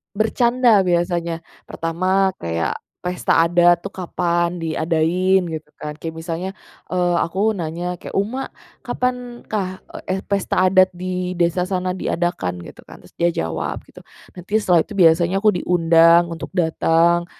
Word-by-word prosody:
Bercanda 235 +2 +3
biasanya, 170 -1 0 0.2
pertama 185 +4 0
kayak 85 0 -2 0.2
pesta 180 -2 +1
adat 175 0 +4
tuh 200 - -5
kapan 175 -1 -1
diadain 165 +4 +1
gitu 160 -3 -6
kan. 150 - -6
Kayak 165 -1 -6
misalnya, 165 +3 -4 0.4
eee, 180 -1 +1
aku 195 +6 0
nanya 175 -1 -4
kayak, - - -9
"Uma, 225 +7 -1 0.3
kapan 250 -1 -3
kah," 185 -3 -4
eee, - - -8
eh, 190 +1 -1
"pesta 200 -2 -1
adat 185 0 +5
di 180 0 -3
desa 175 +1 +1
sana 185 -1 -1
diadakan?" 170 - -2
gitu - - -12
kan. - - -14
Terus - - -18
dia 170 - +3 0.2
jawab 80 -3 -4
gitu, - - -16 0.4
nanti 180 +4 -2
setelah 180 -6 +3
itu 215 - -10
biasanya 170 0 +4
aku 215 - +6
diundang 170 -1 +4
untuk 165 - -6
datang, 170 0 +2
175 Hz, 145 wpm, -20 LUFS, 165-190 Hz, 0.4 s, aku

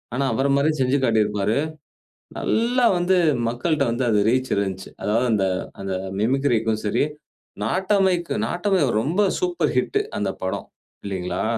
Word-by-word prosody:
ஆனா, 140 - 0
அவர 135 - +1
மாரியே 155 +2 +2
செஞ்சு 130 +2 +2
காட்டியிருப்பாரு. 105 0 +1 0.8
நல்லா 240 +2 +1
வந்து 180 +1 +2 0.3
மக்கள்ட்ட 140 +5 0
வந்து 120 +2 -1
அது 105 -2 +3
ரீச் 130 +2 0
இருந்துச்சு. 95 -1 -3
அதாவது 115 +4 +1
அந்த 100 -2 +2 0.4
அந்த 95 -1 -3 0.3
மிமிக்ரிக்கும் 115 -3 +1
சரி, 105 - +1 0.6
நாட்டமைக்கு 185 - +1
நாட்டமை 190 - 0 0.2
ரொம்ப 165 - 0 0.2
சூப்பர் 360 -1 0
ஹிட் 415 -1 +1 0.2
அந்த - - -1
படம், - - -3 0.4
இல்லிங்களா? 90 -2 -3
130 Hz, 130 wpm, -23 LUFS, 105-175 Hz, 0.8 s, அது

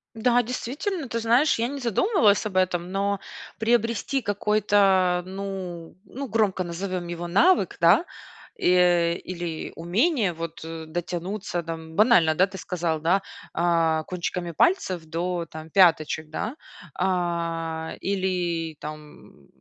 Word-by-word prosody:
Да, 245 +2 +3
действительно, 270 - -4
ты 230 -1 -2
знаешь, 240 +6 +3
я 235 +2 0
не 280 0 -5
задумывалась 235 - +3
об 190 -3 -4
этом, 180 -1 +1
но 200 +1 -1 0.4
приобрести 230 +3 +1
какой-то, 200 -3 +2
ну 185 -3 -6
ну, 275 +4 -6
громко 205 -4 +1
назовем 180 +1 -4
его, 175 0 -5
навык, 200 - +3
да, 170 - +5 0.5
и 175 -1 +3
или 175 -3 -5
умение 205 - +1
вот 165 -1 -7
дотянуться 175 +3 -4
там, 160 0 -7
банально, 200 -6 +5
да, 185 +4 +4
ты 190 0 -9
сказал, 165 -3 -2
да: 180 +5 +2 0.3
а, 165 -2 +2
"Кончиками 180 -1 -4
пальцев 185 - +1
до, 170 +2 -3
там, 160 0 -10
пяточек", 160 -3 +3
да. 215 - -4 0.4
А, 165 -3 -1
или, 180 -4 -1
там, 150 0 -11
180 Hz, 120 wpm, -25 LUFS, 170-210 Hz, 0.5 s, да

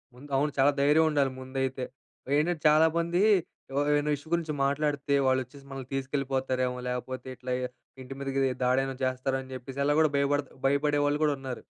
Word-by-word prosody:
ముందు 140 +4 -13
అవును 145 +2 +2
చాలా 140 +2 +6
ధైర్యం 150 +3 +5
ఉండాలి 140 -3 +2
ముందైతే. 130 0 -3 0.5
ఏంటంటే 160 +1 0
చాలామంది 165 +3 +3 0.5
ఎవ్ 135 - 0
ఏమైనా 145 0 +2
ఇష్యూ 145 +2 -13
గురించి 165 -3 0
మాట్లాడితే 145 0 0
వాళ్ళొచ్చేసి 130 +2 -1
మనల్ని 135 -1 -7
తీసుకెళ్ళిపోతారేమో 130 -2 -1
లేపోతే 130 +1 -4
ఇట్లా 125 0 -6 0.5
ఇంటి 130 +1 -8
మీద‌కి 135 0 -2 0.2
దాడేమైనా 135 +1 +1
చేస్తారని 130 +1 -2
జెప్పేసి 130 +2 -6
అలా 145 +1 +3
గూడా 155 -1 +5
భయపడత 140 0 +1 0.2
భయపడే 145 +2 +2
వాళ్ళు 145 0 +2
గూడా 150 -1 +3
ఉన్నారు. 130 -2 -6
140 Hz, 155 wpm, -28 LUFS, 130-145 Hz, 0.5 s, చాలా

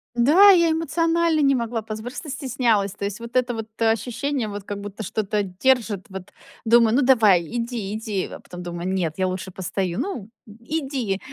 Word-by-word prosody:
Да, 310 +12 +7
я 340 -3 +4
эмоционально 330 0 +1
не 275 -1 +4
могла 235 -2 -2
позв 215 0 -6
просто 255 +6 -7
стеснялась. 245 -8 0
То 205 - -9
есть 200 +2 -3
вот 235 +1 -10
это 250 -1 +2
вот 225 -1 -5
ощущение, 235 +3 0
вот 205 -1 -6
как 205 0 -6
будто 205 +1 -7
что-то 210 +1 -1
держит, 210 +1 0
вот 190 -1 -9 0.3
думаю: 230 0 +4
"Ну, 280 - +4
давай, 225 -9 +5
иди, 230 0 -4
иди". 215 -3 -3
А - - -8
потом 180 0 -10
думаю: 175 0 -5
"Нет, 180 -5 -1
я 185 -1 +1
лучше 185 +1 -4
постою. 185 -1 -3
Ну, 245 - -4 0.2
м, 210 0 -14
иди, 265 -8 -2
225 Hz, 185 wpm, -23 LUFS, 195-265 Hz, 0.3 s, Да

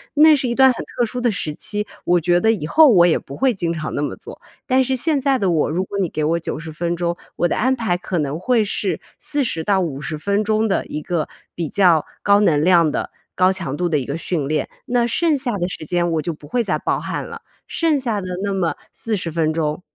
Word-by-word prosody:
那 305 +1 +7
是 260 -2 -1
一 235 - -1
段 265 -1 +6
很 - - -6
特 240 -1 -2
殊 245 +2 -5
的 240 - +2
时 160 -7 -3
期， 210 +6 -4 0.2
我 175 0 +3
觉 175 +2 +2
得 220 +4 +3
以 200 -9 -2
后 305 - +6
我 180 -7 +6
也 170 - +3
不 140 - -10
会 265 -2 +2
经 175 -5 -2
常 155 -2 -4
那 - - -2
么 145 - -2
做。 - - -12 0.2
但 260 0 +3
是 260 +1 0
现 290 +1 +1
在 270 -1 +2
的 195 -6 +1
我， 155 -3 +1
如 180 +4 -1
果 200 - -5
你 180 -4 0
给 155 - -3
我 165 +2 +1
90 160 -1 -5
分 170 +2 -2
钟， 170 0 -1 0.2
我 175 - +1
的 - - -1
安 260 +3 +2
排 225 -8 0
可 180 0 -4
能 150 0 -2
会 235 +3 +2
是 200 - -2 0.2
40 255 - -1
到 195 0 +2
50 155 -2 -3
分 200 +6 0
钟 215 +1 +1
的 195 - 0
一 150 - -5
个 170 -3 -2 0.2
比 165 -3 -4
较 175 -6 +4 0.2
高 200 0 +5
能 150 -7 +3
量 170 -3 +4
的、 - - -3 0.2
高 185 +1 +4
强 170 -8 -4
度 175 +1 0
的 155 -3 +1
一 130 - -2
个 140 +3 -3
训 160 -5 -2
练。 150 -1 -1 0.2
那 240 -1 +2
剩 310 +4 +1
下 250 -5 -2
的 175 0 -1
时 155 - -6
间 175 +1 0
我 155 - 0
就 165 +2 -3
不 150 -1 -14
会 240 +10 0
再 - - 0
爆 - - -1
汗 - - -4
了， - - -9 0.3
剩 325 -3 +1
下 230 -5 -1
的 185 - -6 0.2
那 200 - -1
么 180 -4 0 0.2
40 200 -7 -2
分 160 -1 0
钟 155 +1 -2
180 Hz, 260 characters per minute, -20 LUFS, 160-235 Hz, 0.3 s, 那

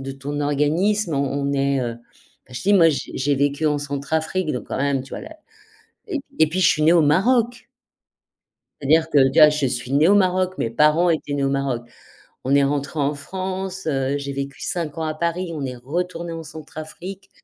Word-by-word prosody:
de 135 0 -5
ton 145 +2 -5
organisme, 160 +6 +1
on 140 - +1 0.2
on - - -1
est, 140 -1 +1
heu, 120 -2 -2 0.5
bah 130 - -17
je 125 - -6
dis, 205 - +3
moi 170 -4 +6
j'ai 150 - -3
j'ai 140 +2 +1
vécu 145 +2 0
en 150 -1 +1
Centrafrique, 155 +4 -2
donc 125 - -5
quand - - -3
même 140 -1 0
tu 135 - -15
vois - - -6
là 320 - -10 0.7
et 365 - -2
puis - - -15
et 160 - +6
puis 180 +4 -2
je - - +6
suis 155 - +1
née 165 +2 +6
au 170 - +5
Maroc! 235 - +2 1.1
C'est-à-dire 160 +3 +3
que 145 - +4
tu 135 - -1
vois, 155 -1 +10
je 150 -2 0
suis 125 +1 -4
née 150 +5 +4
au 205 - +6
Maroc, 185 -1 +2
mes 115 - -1
parents 150 +7 +3
étaient 150 -3 -1
nés 140 -1 0
au - - +2
Maroc. 135 -3 -1 0.6
On 135 +2 0
est 140 - +5
rentrés 140 +2 -2
en 145 +1 +1
France, 190 +3 -5
heu, 135 -1 0
j'ai 140 0 -5
vécu 140 0 -5
5 165 -3 -3
ans 160 - -2
à 155 - -2
Paris, 170 +2 -2
on 145 -3 -4
est 125 -1 -5
retournés 170 +6 -4
en 165 0 -6
Centrafrique. 160 +5 -9
150 Hz, 215 wpm, -22 LUFS, 140-175 Hz, 1.1 s, vois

